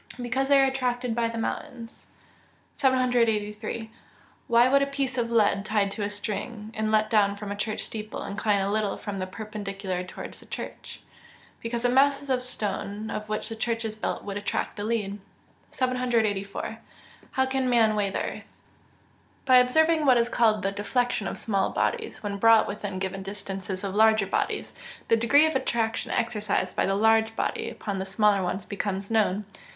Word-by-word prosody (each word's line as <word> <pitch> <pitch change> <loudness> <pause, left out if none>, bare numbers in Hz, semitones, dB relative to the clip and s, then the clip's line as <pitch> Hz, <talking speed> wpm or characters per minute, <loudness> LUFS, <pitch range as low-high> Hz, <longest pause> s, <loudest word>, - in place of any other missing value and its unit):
_ - - -4
Because 265 +3 0
they 280 0 +6
are 270 - +6
attracted 250 -2 -1
by 230 0 +1
the 230 - -5
mountains. 230 0 -5 0.7
783. 230 -4 +1 0.6
_Why 240 +2 +5
would 275 0 +5
a 280 - +2
piece 275 -2 -2
of 235 -2 -1
lead 205 -4 +3
tied 205 -2 +1
to 210 - -5
a 205 - -1
string, 210 +2 -5
and 215 0 -1
let 215 0 +3
down 205 -2 +3
from 205 0 -6
a - - -2
church 210 +1 -3
steeple, 215 -1 -6
incline 200 0 0
a 195 +1 0
little 210 -1 0
from 200 -2 -5
the 185 - -3
perpendicular 195 -3 -5
towards 180 - -8
the - - -15
church?_ - - -7 0.6
Because 235 +1 -3
the 245 - +3
masses 275 +2 +3
of 255 -1 +2
stone 210 -2 -3
of 215 0 -5
which 215 0 -2
the 225 - -5
church 230 0 -2
is 215 -1 -3
built 215 - -3
would 200 -1 -4
attract 205 - -2
the 205 - -5
lead. 210 -3 -2 0.5
784. 230 -6 -1 0.5
How 265 - +2
can 265 -1 0
man 225 -3 +4
weigh 205 -2 +1
the - - -2
earth? - - -5 1.0
By 255 -2 +7
observing 310 +5 +4
what 255 -2 +6
is 235 0 +2
called 215 -4 +2
the 195 - +1
deflection 215 +1 -1
of - - -4
small 195 -3 0
bodies 450 - -2
when 200 -1 -3
brought 225 +2 +6
within 200 -2 -4
given 190 0 -3
distances 195 -1 -5
of 195 -1 -3
larger 220 -1 +5
bodies, 195 - -2 0.4
the - - +6
degree 255 +7 +5
of 315 -2 0
attraction 230 -3 -1
exercised 210 -5 -1
by - - +1
the 195 - +1
large 220 +1 +3
body - - -2
upon 200 -3 -4
the 190 - -3
smaller 200 0 +3
one 180 +1 -1
becomes 200 0 -3
known. 210 -2 +2
220 Hz, 180 wpm, -26 LUFS, 200-245 Hz, 1.0 s, By